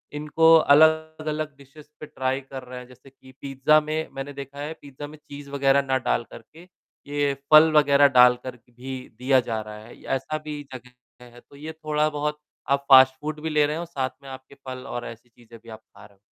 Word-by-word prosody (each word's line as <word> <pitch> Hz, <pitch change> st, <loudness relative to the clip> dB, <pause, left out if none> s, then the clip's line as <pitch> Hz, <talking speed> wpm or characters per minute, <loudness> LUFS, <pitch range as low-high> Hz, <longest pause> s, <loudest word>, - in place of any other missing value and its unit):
इनको 160 Hz, +2 st, +4 dB
अलग-अलग 155 Hz, 0 st, +2 dB
डिशेज़ 140 Hz, +2 st, -16 dB
पे -, -, -8 dB
ट्राई 130 Hz, -2 st, -3 dB
कर 135 Hz, -1 st, -10 dB
रहे 125 Hz, 0 st, -9 dB
हैं। 125 Hz, -, -12 dB
जैसे 125 Hz, +2 st, -18 dB
कि 130 Hz, 0 st, -19 dB
पिज़्ज़ा 140 Hz, +2 st, +2 dB
में 155 Hz, +1 st, -4 dB
मैंने 135 Hz, +1 st, -6 dB
देखा 140 Hz, 0 st, -10 dB
है, 150 Hz, +2 st, -5 dB
पिज़्ज़ा 145 Hz, +1 st, -10 dB
में 155 Hz, +1 st, -13 dB
चीज़ 145 Hz, -1 st, -12 dB
वगैरह 140 Hz, 0 st, +2 dB
ना 135 Hz, -1 st, -1 dB
डालकर -, -, -3 dB
के, 170 Hz, +3 st, -18 dB, 0.4 s
ये 145 Hz, -1 st, -1 dB, 0.2 s
फ़ल 155 Hz, +1 st, +8 dB
वगैरह 145 Hz, -1 st, +5 dB
डालकर 125 Hz, 0 st, +4 dB
क 120 Hz, 0 st, -27 dB
भी 130 Hz, +1 st, -6 dB, 0.2 s
दिया 130 Hz, +1 st, +3 dB
जा 110 Hz, -1 st, -2 dB
रहा 105 Hz, 0 st, -10 dB
है। 120 Hz, -, -16 dB
ऐसा 135 Hz, +4 st, -3 dB
भी 150 Hz, -1 st, -6 dB
जगह 125 Hz, 0 st, -11 dB, 0.3 s
है, 120 Hz, 0 st, -16 dB
तो 140 Hz, -, -21 dB
ये 155 Hz, +3 st, -8 dB
थोड़ा 155 Hz, -1 st, -1 dB
बहुत 150 Hz, 0 st, -4 dB, 0.3 s
आप 140 Hz, 0 st, 0 dB
फ़ास्ट 130 Hz, -1 st, +8 dB
फ़ूड 155 Hz, 0 st, -5 dB
भी 160 Hz, -, -3 dB
ले 150 Hz, -1 st, +2 dB
रहे 150 Hz, +2 st, -3 dB
हो, 170 Hz, -, -5 dB
साथ 135 Hz, -6 st, -3 dB
में 135 Hz, -, -11 dB
आपके 130 Hz, +1 st, -12 dB
फल 130 Hz, 0 st, -7 dB
और 120 Hz, -, -6 dB
ऐसी 115 Hz, +1 st, -12 dB
चीज़ें 115 Hz, 0 st, -17 dB
भी 115 Hz, -, -15 dB
आप 110 Hz, 0 st, -10 dB
खा -, -, -18 dB
रहे 100 Hz, -, -20 dB
हो। -, -, -36 dB
140 Hz, 215 wpm, -24 LUFS, 130-150 Hz, 0.4 s, फ़ल